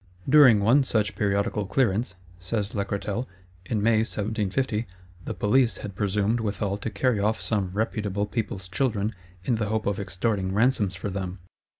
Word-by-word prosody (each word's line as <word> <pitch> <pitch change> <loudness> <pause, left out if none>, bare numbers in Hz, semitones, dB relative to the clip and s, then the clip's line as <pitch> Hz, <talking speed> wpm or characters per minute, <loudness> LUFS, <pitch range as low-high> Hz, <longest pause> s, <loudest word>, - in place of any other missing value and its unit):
"During 130 -7 +7
one 125 +7 +5
such 105 -5 0
periodical 100 0 0
clearance," 100 -2 +1 0.2
says 100 +3 -2
Lacretelle, 100 +3 -2 0.4
"in 105 -3 -1
May, 115 0 +4
1750, 110 +1 -1 0.4
the - - -3
Police 110 +2 +2
had 100 - -7
presumed 105 +3 +1
withal 100 -2 -2
to 105 +2 -4
carry 110 +2 +1
off 110 +2 +1
some 100 -4 -1
reputable 105 -1 -1
people's 105 -4 -4
children, 105 +1 0 0.3
in 120 +3 +1
the 110 -2 -1
hope 110 +1 -1
of 100 -1 0
extorting 95 0 -1
ransoms 110 -4 +2
for 95 +2 -4
them. 95 -1 -4
105 Hz, 155 wpm, -26 LUFS, 100-115 Hz, 0.4 s, During